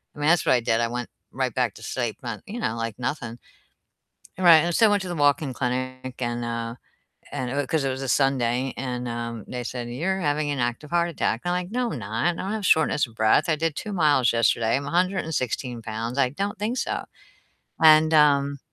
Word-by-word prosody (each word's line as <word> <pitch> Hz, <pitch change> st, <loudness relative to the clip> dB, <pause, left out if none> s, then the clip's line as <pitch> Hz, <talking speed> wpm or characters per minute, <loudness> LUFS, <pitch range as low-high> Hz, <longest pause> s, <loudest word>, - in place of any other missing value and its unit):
I -, -, -11 dB
mean, 150 Hz, +2 st, +2 dB
that's 175 Hz, -2 st, +3 dB
what -, -, +4 dB
I -, -, +3 dB
did. 115 Hz, 0 st, +1 dB
I 115 Hz, -, +1 dB
went 120 Hz, 0 st, -4 dB, 0.2 s
right 130 Hz, -2 st, -2 dB
back 125 Hz, -5 st, 0 dB
to 110 Hz, -, -12 dB
sleep 120 Hz, -1 st, -3 dB
and, 115 Hz, -3 st, -5 dB
you 230 Hz, +4 st, -6 dB
know, 115 Hz, -, -1 dB
like 115 Hz, 0 st, -4 dB
nothing. 120 Hz, -2 st, -4 dB, 1.0 s
And, 185 Hz, -, -3 dB
right, 165 Hz, -2 st, +10 dB
and 175 Hz, -1 st, -1 dB
so 225 Hz, -, +5 dB
I 210 Hz, -, +3 dB
went 205 Hz, -1 st, +2 dB
to 185 Hz, -, -6 dB
the 175 Hz, -, -3 dB
walk-in 145 Hz, -1 st, +2 dB
clinic 130 Hz, +1 st, -3 dB
and, 120 Hz, 0 st, -2 dB
uh 115 Hz, 0 st, -3 dB, 0.6 s
and 125 Hz, -1 st, -3 dB
it -, -, -4 dB
w 145 Hz, -1 st, 0 dB
'cause 155 Hz, -3 st, 0 dB
it -, -, +1 dB
was 130 Hz, +1 st, -4 dB
a 130 Hz, -, -3 dB
Sunday, 130 Hz, -2 st, +1 dB
and, 125 Hz, -2 st, -4 dB
um, 115 Hz, -2 st, -5 dB
they 125 Hz, -1 st, -5 dB
said, 120 Hz, -1 st, -5 dB
"You're 175 Hz, +10 st, -1 dB
having 145 Hz, -1 st, 0 dB
an 140 Hz, -, -3 dB
active 120 Hz, +6 st, -2 dB
heart 170 Hz, 0 st, +2 dB
attack." 120 Hz, -7 st, -1 dB
And 175 Hz, -, 0 dB
I'm -, -, +1 dB
like, 180 Hz, -, -11 dB
"No, 245 Hz, -1 st, -1 dB
I'm -, -, -4 dB
not, 110 Hz, +5 st, -3 dB
I 175 Hz, -, +2 dB
don't 190 Hz, +4 st, -4 dB
have 215 Hz, -3 st, -3 dB
shortness 155 Hz, -5 st, +3 dB
of 115 Hz, -, -18 dB
breath, 110 Hz, +10 st, +3 dB
I 155 Hz, -, +3 dB
did 160 Hz, -1 st, -1 dB
2 210 Hz, -, -5 dB
miles 145 Hz, -, +3 dB
yesterday, 115 Hz, 0 st, +2 dB
I'm 140 Hz, +1 st, -2 dB
116 160 Hz, -, -1 dB
pounds, 115 Hz, +3 st, -4 dB
I 125 Hz, -, +3 dB
don't 195 Hz, +7 st, -4 dB
think 230 Hz, +5 st, -2 dB
so." -, -, -2 dB, 0.8 s
And, 155 Hz, 0 st, +7 dB
um 140 Hz, -2 st, +4 dB
135 Hz, 235 wpm, -24 LUFS, 120-160 Hz, 1.0 s, right